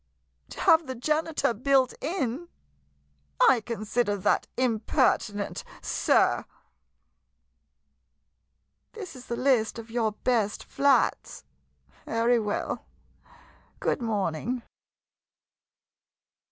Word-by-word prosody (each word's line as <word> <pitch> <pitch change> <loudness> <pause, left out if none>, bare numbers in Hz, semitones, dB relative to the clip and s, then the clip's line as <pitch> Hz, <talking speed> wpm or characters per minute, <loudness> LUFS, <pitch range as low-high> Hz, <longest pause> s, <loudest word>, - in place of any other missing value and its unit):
To - - -10
have 320 -2 +5
the 260 - -4
janitor 305 +1 0
built 260 +2 +2
in! 310 -1 -2 0.9
I 250 -3 +5
consider 215 -1 -1
that 190 - +1
impertinent 215 -3 0
— - - -18 0.2
sir! - - +3 2.5
This 385 -9 -8
is 255 0 -12
the 235 - -2
list 245 -4 +1
of 230 0 -9
your 225 -2 0
best 215 -3 0
flats? 280 -1 +1 0.6
Very 230 +1 +2
well 210 -2 -3 0.4
— - - -24 0.3
good - - -1
morning. 220 +2 -2
240 Hz, 90 wpm, -27 LUFS, 220-270 Hz, 2.5 s, have